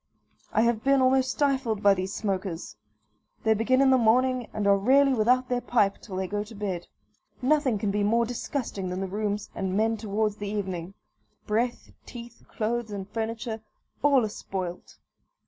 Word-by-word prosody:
I - - +3
have 235 -2 +1
been 275 0 +4
almost 260 0 +3
stifled 260 -7 0
by 200 -1 +7
these 185 0 -3
smokers. 190 -5 -3 0.7
They 220 - +4
begin 245 +5 +2
in 270 -1 +5
the 260 - +5
morning, 250 +1 +3
and 210 - -3
are 200 0 +6
rarely 270 +7 +4
without 250 +2 +3
their 245 -1 -1
pipe 215 -5 +1
till 195 - -8
they 190 0 -1
go 205 +2 -2
to 220 +2 -12
bed. 190 -4 -4 0.5
Nothing 270 -3 +2
can 200 0 -1
be 205 +1 0
more 230 +3 +3
disgusting 230 -5 -4
than 180 +1 -3
the - - -1
rooms 205 +1 -3
and 190 -1 -2
men 225 +1 +2
towards 210 0 -1
the 205 -1 -4
evening 190 -3 -4 0.5
breath, 235 +3 -1 0.2
teeth, 235 -1 -10
clothes, 230 +1 -2
and 200 -2 -5
furniture, 225 +1 -4 0.4
all 275 -5 +4
are - - -3
spoilt. 185 -3 -6
220 Hz, 175 wpm, -27 LUFS, 200-245 Hz, 0.7 s, by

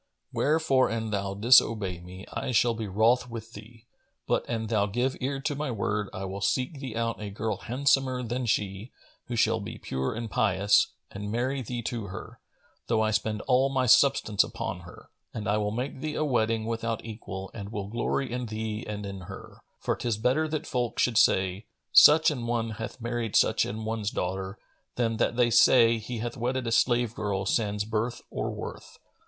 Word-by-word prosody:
Wherefore 145 -3 +2
an 110 -1 -3
thou 100 -1 -2
disobey 105 -4 +4
me, 90 +2 -10
I 130 - -3
shall 120 +1 +4
be 110 -1 -4
wroth 115 +6 +2
with 115 0 -8
thee; 110 +2 -13 0.4
but, - - +1
an 115 -2 -2
thou 105 -2 +1
give 125 +6 -1
ear 135 +2 -1
to 145 - -1
my 145 0 -3
word, 105 -2 -2
I 95 - -5
will 95 +1 -5
seek 130 - 0
thee 130 -5 -6
out 115 -1 -2
a 105 - -4
girl 105 0 -3
handsomer 130 0 +1
than 120 +1 -3
she, 100 +2 -1 0.4
who 120 - -3
shall 110 0 +2
be 100 - -7
pure 65 +8 -3
and 115 0 -4
pious, 100 -1 +3 0.2
and 105 +1 -5
marry 130 +4 -1
thee 120 0 -5
to 115 -2 -3
her, - - -9 0.5
though 110 -2 +2
I 110 - +1
spend 105 0 -1
all 130 +1 +3
my 130 -1 +1
substance 115 -4 +4
upon - - -5
her; - - -14 0.3
and 110 -3 -4
I 105 +1 +2
will 105 -1 0
make 125 +5 -4
thee 150 0 -3
a 155 - 0
wedding 115 -4 +1
without 115 0 -3
equal 95 -4 -7
and 100 -2 -7
will 100 -2 -4
glory 120 +4 -2
in 125 0 -3
thee 110 +1 -4
and 105 -1 -5
in 100 -1 -6
her; - - -10 0.2
for - - -1
'tis 115 -3 -2
better 130 +8 +1
that 155 -1 -3
folk 125 -3 -2
should 120 -3 +3
say, 95 +2 +2 0.3
Such 155 +1 +8
an 120 -5 -4
one 115 -1 -1
hath 110 +3 -6
married 120 -1 -3
such - - +4
an 110 +2 -5
one's 110 -2 -2
daughter, 95 +2 -3 0.4
than 115 -2 0
that 120 - +1
they 120 -1 +3
say, 115 0 +6
He 115 +3 -6
hath 120 +1 -4
wedded 125 +2 -1
a 115 - -2
slave 120 -1 +2
girl 100 -3 -2
sans 105 0 0
birth 115 +3 -2
or - - -2
worth." - - -8
115 Hz, 195 wpm, -27 LUFS, 105-125 Hz, 0.5 s, Such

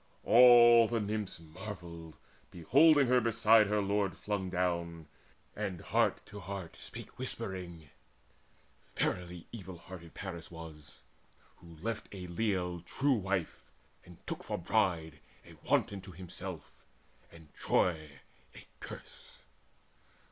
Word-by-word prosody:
All 120 -1 +8
the 115 0 -1
Nymphs 105 -3 -3
Marvelled, 85 -2 -9 0.3
beholding 140 - +5
her 125 0 +4
beside 115 -1 +5
her 105 0 +1
lord 100 0 0
Flung 100 -3 -3
down, 85 -2 -2 0.5
and 100 -4 -3
heart - - 0
to 105 - -10
heart 100 -3 -7
spake - - -11
whispering: 85 -4 -4 1.1
"Verily 90 -1 -2
evil 95 -5 -8
hearted 85 -1 -12
Paris 85 -5 -7
was, 80 -3 -11 0.6
Who 85 -1 -14
left 115 -1 -3
a 95 -3 -7
leal 90 -1 -1
true 135 +11 +1
wife, 95 -6 -2 0.4
and 90 -2 -15
took - - -5
for - - -3
bride 80 -5 0 0.3
A - - -14 0.2
wanton, 100 -1 +1
to 90 0 -11
himself 90 -2 -8 0.6
and 80 -3 -16
Troy 75 -6 0 0.3
a - - -12
curse. - - -11
95 Hz, 120 wpm, -32 LUFS, 85-105 Hz, 1.1 s, All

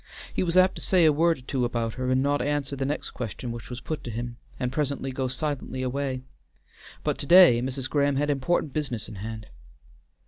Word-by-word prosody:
He - - 0
was 175 -1 +1
apt 185 0 +6
to - - -5
say 180 -3 +4
a 155 - +6
word 165 +2 +3
or - - -13
two 130 0 -2
about 115 -2 -1
her 130 -1 -2
and 130 +1 +3
not 145 0 +1
answer 145 0 -1
the 135 0 -2
next 150 - -3
question 120 +1 -5
which 115 -1 -8
was 125 -1 -5
put 155 - -4
to - - -6
him, 120 +1 -5 0.2
and 125 -1 -1
presently 140 -1 -2
go 130 0 -2
silently 130 -1 -3
away, 130 0 -2 0.8
but - - -1
to 140 - -3
day 175 -9 +8
Mrs. 130 0 -2
Graham 140 0 +2
had 145 +2 +1
important 145 +1 0
business 135 -8 -2
in 105 - -9
hand. 110 +2 -6
135 Hz, 215 wpm, -26 LUFS, 125-145 Hz, 0.8 s, day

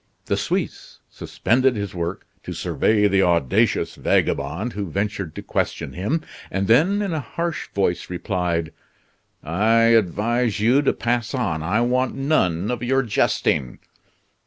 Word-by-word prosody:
The - - 0
Suisse - - -3
suspended 130 +1 +1
his 100 -3 -4
work 85 +1 -4 0.2
to - - -6
survey 105 -1 +2
the 95 -1 +3
audacious 85 -8 +2
vagabond 80 - 0
who 100 -3 -4
ventured 100 -2 -3
to - - -7
question - - -2
him, 105 - -1 0.3
and 95 0 -1
then 175 - +4
in 195 -4 -2
a 155 - -1
harsh 170 +5 -4
voice 90 -3 0
replied: 90 -3 -2 0.7
"I 115 +8 +3
advise 115 +3 +1
you 120 +6 +4
to 145 - +2
pass 120 +1 -1
on. 95 -11 -1
I 95 +8 +1
want 125 +1 +1
none 110 - +1
of 120 -1 -3
your 135 +2 +1
jesting." 75 - 0
105 Hz, 140 wpm, -22 LUFS, 90-125 Hz, 0.7 s, then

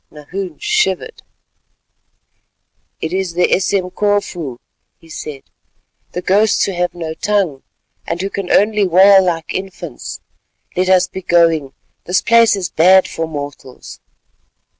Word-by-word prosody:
Nahoon 180 +6 -7
shivered. 430 +2 -1 1.8
"It 160 +2 -3
is 190 -2 -2
the 175 +1 +2
Esemkofu," 185 - -1 0.4
he 165 - -20
said, 150 -3 -8 0.7
"the 180 - -4
ghosts 205 +4 +3
who - - 0
have 180 -1 -2
no 165 -2 -5
tongue, 185 -7 -1 0.5
and 170 - -3
who 195 +2 -3
can 195 -2 -5
only 210 -1 +3
wail 190 +2 +6
like 165 -3 -2
infants. 180 -7 -6 0.6
Let 185 +1 0
us 185 -1 +4
be 190 - -8
going; 165 -6 +2 0.3
this 180 +1 +1
place 230 -2 +5
is 190 -3 -3
bad 185 +4 +5
for 165 0 -4
mortals." 145 -4 -8
180 Hz, 125 wpm, -17 LUFS, 165-195 Hz, 1.8 s, wail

